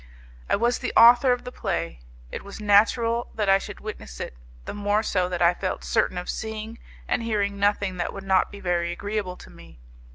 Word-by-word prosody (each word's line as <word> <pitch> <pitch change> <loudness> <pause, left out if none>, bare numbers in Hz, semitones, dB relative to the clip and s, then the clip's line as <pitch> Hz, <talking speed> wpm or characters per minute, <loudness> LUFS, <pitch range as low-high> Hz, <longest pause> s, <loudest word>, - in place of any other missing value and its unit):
I - - +4
was 240 +3 +1
the - - -3
author 245 +2 +8
of 245 - 0
the 250 - -7
play; 85 - -3 0.3
it - - -6
was 200 +1 -9
natural 230 +3 +3
that 210 -2 -1
I 195 0 +5
should 205 0 -8
witness 70 - -8
it, - - -5 0.3
the - - -5
more 205 +1 0
so 185 -4 0
that 175 -1 -1
I 170 +1 +5
felt 185 +1 -4
certain 180 - 0
of 180 - -4
seeing 220 +1 -5 0.3
and - - 0
hearing 205 -3 -1
nothing 200 -2 +1
that 175 - -2
would 195 - -8
not 190 -1 +3
be 200 - -10
very 175 -2 -1
agreeable 200 0 -4
to - - -13
me. - - -15
200 Hz, 205 wpm, -25 LUFS, 180-220 Hz, 0.3 s, author